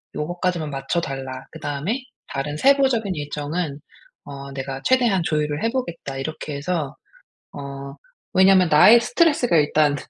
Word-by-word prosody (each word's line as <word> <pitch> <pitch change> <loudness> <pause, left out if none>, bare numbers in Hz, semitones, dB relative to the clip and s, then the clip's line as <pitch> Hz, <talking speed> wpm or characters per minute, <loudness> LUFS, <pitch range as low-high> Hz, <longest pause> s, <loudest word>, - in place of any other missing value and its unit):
요거까지만 175 0 -2
맞춰 135 +4 -2
달라. 135 -4 -5
그다음에 150 - -3 0.3
다른 145 +2 -4
세부적인 260 - +3
일정은 150 +1 -4 0.5
어 140 -1 -8
내가 135 0 -5
최대한 240 -8 +3
조율을 150 -2 -1
해보겠다." 200 - -3
이렇게 150 +1 -5
해서 150 -1 -3 0.6
어 140 -1 -7 0.4
왜냐면 190 -2 +5
나의 210 +10 +7
스트레스가 260 - +2
일단 150 -1 +3
150 Hz, 315 characters per minute, -22 LUFS, 140-190 Hz, 0.6 s, 나의